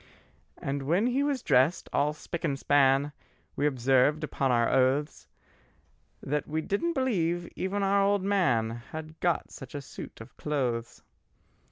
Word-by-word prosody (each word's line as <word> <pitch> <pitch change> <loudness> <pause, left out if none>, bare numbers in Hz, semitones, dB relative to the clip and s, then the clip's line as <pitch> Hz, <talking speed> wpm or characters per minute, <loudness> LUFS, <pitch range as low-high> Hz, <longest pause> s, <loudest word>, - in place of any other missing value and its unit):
And 140 +1 -3
when 180 +8 +2
he 250 +3 +1
was 280 -3 -1
drest, 130 +8 +3
all 145 +1 +2
spick 165 +2 -7
and 140 -5 0
span, 140 0 +3 0.4
We 145 - +1
observed 135 +2 +2
upon 135 -2 0
our 120 -1 +3
oaths 135 +3 +1 1.0
That 150 +2 -2
we 155 +1 -1
didn't 205 - -1
believe 175 - 0
even 195 +2 -2
our 200 +1 +3
old 200 -1 +2
man 130 - +2 0.2
Had 160 0 -8
got 175 -3 0
such - - -10
a - - -2
suit 135 - -10
of 115 +3 -12
clothes. 125 -6 -2
150 Hz, 150 wpm, -28 LUFS, 135-190 Hz, 1.0 s, drest